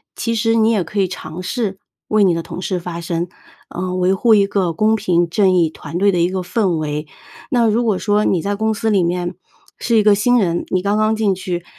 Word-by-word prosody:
其 230 0 -2
实 225 +1 +1
你 225 0 +3
也 200 -5 +1
可 200 +5 -4
以 190 - +2
尝 165 -1 -7
试 195 0 -3 0.3
为 215 -1 +3
你 180 - +3
的 165 0 -3
同 180 - -7
事 185 +1 -2
发 170 -1 -6
声。 170 +1 -3 0.4
呃， 180 +1 -4
维 185 +1 +2
护 220 +4 +3
一 200 -1 +4
个 190 -4 -1
公 215 +5 +2
平 175 -5 +1
正 190 +1 +3
义 170 -3 +3
团 160 +1 -7
队 200 +1 +3
的 175 - 0
一 170 - +2
个 185 0 -3
氛 190 +1 0
围。 150 0 -3 0.4
那 240 -3 +2
如 235 +3 +1
果 210 -4 +1
说 210 0 +1
你 180 - +1
在 200 +3 -2
公 220 +1 0
司 220 +1 -1
里 200 -4 +3
面 175 0 -2 0.4
是 235 -2 +1
一 215 - +4
个 210 -1 +5
新 245 +4 +3
人， 175 -4 0
你 185 - 0
刚 200 +2 0
刚 215 0 +2
进 205 -3 +1
去， 175 -2 -4
190 Hz, 260 characters per minute, -18 LUFS, 175-215 Hz, 0.4 s, 个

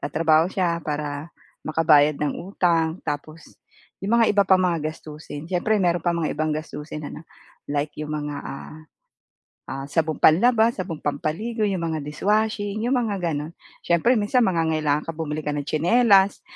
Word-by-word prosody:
nagtatrabaho 160 +3 +2
sya 170 -3 0
para 150 +1 -4 0.4
makabayad 155 -2 +4
ng 150 -1 -1
utang, 170 -3 0
tapos 155 +2 -6 0.5
yung 210 +5 +1
mga 225 - +4
iba 200 -1 +4
pang 190 -1 +5
mga 170 -3 +1
gastusin. 150 -1 -9
Syempre 190 +4 +1
meron 175 -1 +2
pang 170 -1 +1
mga 160 - -1
ibang 155 0 0
gastusin 150 -1 -7
ano, - - -8 0.5
like 145 +1 -1
yung 150 0 -4
mga, 145 -1 -4
ah, 135 +2 -8 0.9
ah, 135 +1 -5
sabong 160 0 0
panlaba, 225 +7 +5
sabong 175 -5 -5
pampaligo, 190 +10 -2
yung 190 -4 -1
mga 160 -1 -2
dishwashing, 210 +5 -1
yung 260 - +1
mga 210 -4 -2 0.2
gano'n. 150 +2 -4 0.4
Syempre 170 +9 +3
minsan 230 +4 +2
mangangailangan 160 -4 0
ka, - - 0
bumili 155 -1 -3
ka 150 - -1
ng 145 -1 -3
tsinelas, 195 +4 +4
165 Hz, 155 wpm, -23 LUFS, 150-195 Hz, 0.9 s, pang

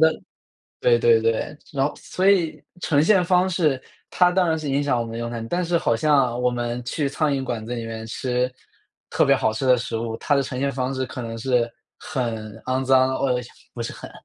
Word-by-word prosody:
得 - - -11 0.6
对 120 -1 +4
对 115 -1 +5
对。 115 +6 -1 0.2
然 135 -1 +1
后 - - -5
所 190 +2 -1
以 160 -6 +1 0.2
呈 145 -5 +2
现 185 0 +4
方 180 +1 +3
式， 155 -8 +1 0.3
它 180 -1 +4
当 180 -1 +2
然 160 0 +1
是 150 -2 -5
影 140 +1 +1
响 140 -4 +1
我 115 - -1
们 115 0 -6
用 115 0 -3
餐， 115 -1 -5
但 180 0 0
是 170 0 +1
好 115 - +1
像 130 -3 +2
我 125 - +3
们 120 0 -3
去 140 +2 -1
苍 150 +2 0
蝇 135 -1 -1
馆 115 -4 -4
子 120 - -3
里 115 -1 -4
面 110 0 -6
吃 125 +2 -1 0.6
特 - - +3
别 - - +5
好 110 - +1
吃 110 +5 -3
的 125 -1 +6
食 120 -1 -3
物， 115 0 -3
它 145 - +1
的 140 - +3
呈 130 -1 -5
现 140 0 +1
方 130 +1 -2
式 130 0 -1
可 130 - -7
能 115 -1 -5
是 120 -1 +1 0.3
很 110 -4 -4
肮 130 +1 0
脏 130 0 +4
哦， 135 - 0
呃， - - -1 0.3
不 120 - -4
是 115 - -4
很 - - -10
130 Hz, 255 characters per minute, -23 LUFS, 115-145 Hz, 0.6 s, 的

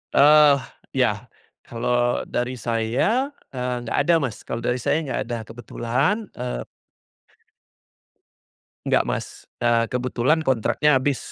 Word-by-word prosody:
Ah, 145 -2 +6 0.3
iya. 120 -3 +1 0.4
Kalau 120 +1 0
dari 125 +1 -3
saya, 120 - 0 0.2
eee, 125 -1 -3
nggak 115 - -3
ada, 170 - +5
Mas, 115 -6 -4
kalau 115 - -4
dari 125 +1 0
saya 155 +6 0
nggak 135 - -3
ada, 120 -1 -3
kebetulan, 120 - -2
eee 125 - -4 2.2
Enggak, - - +3
Mas, - - -2 0.4
eee, 115 -1 +3
kebetulan 130 +5 0
kontraknya 135 +3 +2
habis 140 -1 -2
125 Hz, 115 wpm, -23 LUFS, 120-140 Hz, 2.2 s, Ah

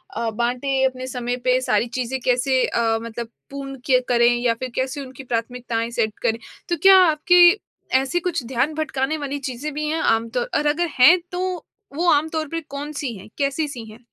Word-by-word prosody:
अ, 230 +1 -1
बाँटें? 250 +4 0
अपने 255 0 -2
समय 245 -1 -3
पे 255 0 +3
सारी 230 -1 +1
चीज़ें 255 +2 -2
कैसे 255 +1 +2
अ, 225 -1 +1
मतलब 230 0 -6 0.2
पूर्ण 275 -1 -7
किया 255 -2 +4
करें 240 0 +4
या 240 -1 +1
फिर 255 +3 -6
कैसे 260 +2 -2
उनकी 260 +1 -11
प्राथमिकताएँ 235 -1 -3
सेट 220 -2 -1
करें? 225 +1 +1 0.3
तो 345 - 0
क्या 385 0 +8
आपकी 350 +4 +5 0.4
ऐसी 270 +6 -1
कुछ 345 -7 -2
ध्यान 265 +5 0
भटकाने 310 -1 -1
वाली 285 -1 -4
चीज़ें 275 +3 -4
भी 300 +1 -3
हैं 320 +1 -1
आम 225 0 +2
तौर 485 - -2
और 300 - -1
अगर 340 +4 +1
हैं 325 +9 +8
तो 360 - -4 0.6
वो 345 +3 0
आम 295 +2 +3
तौर 315 -1 -3
पे 330 +3 -3
कौन-सी 285 -2 -5
हैं? 190 - -13
कैसी-सी 280 -4 -2
हैं? 220 - -14
260 Hz, 190 wpm, -22 LUFS, 240-300 Hz, 0.6 s, क्या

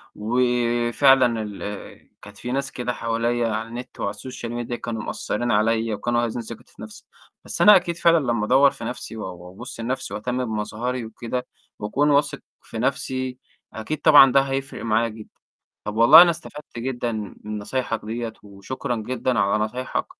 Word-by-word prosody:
وفعلًا 120 +1 +2
ال 105 -1 -8
كانت 100 0 -13
في 125 - -5
ناس 135 +1 -2
كده 125 0 -3
حواليا 115 +1 -1
على 110 +1 -3
النت 120 +2 -9
وعلى 100 - -2
الSocial 120 +2 -7 0.2
Media - - -4
كانوا 115 -2 -5
مأثرين 120 +3 -2
عليا 110 +1 +1
وكانوا 120 +2 0
هازّين 120 +1 -3
ثقتي 115 0 -11
في - - -15
نَفْسي، 110 0 -11 0.4
بس - - -3
أنا 210 0 +9
أكيد 175 -2 +1
فعلًا 170 0 +5
لما 120 -6 0
أدوّر 135 +4 +5
في - - -10
نَفْسي 115 -1 -6
و 110 - -5
وأبُص 90 +8 -10
لنَفْسي 130 +3 -3
وأهتم 125 +4 -2
بمظهري 115 +3 -3
وكده 120 +3 -5 0.3
وأكون 135 +8 +1
واثق 145 0 +2 0.2
في - - -9
نَفْسي، 130 0 -2 0.4
أكيد 140 +8 -4
طبعًا 145 -4 +8
ده 135 - +5
هيفرق 135 0 -4
معايا 115 +1 +2
جدًا. 110 -1 -11 0.5
طَب 105 - -5
والله 115 +8 +10
أنا 175 -1 +6
استفدت 150 -6 -8
جدًا 120 -1 -2 0.3
من 105 0 -5
نصايحك 115 +2 -2
ديّة 115 +1 -4
وشكرا 105 +6 -5
جدًا 120 +1 -1
على 100 +2 +2
نصايحك، 125 +4 -3
120 Hz, 165 wpm, -23 LUFS, 110-130 Hz, 0.5 s, والله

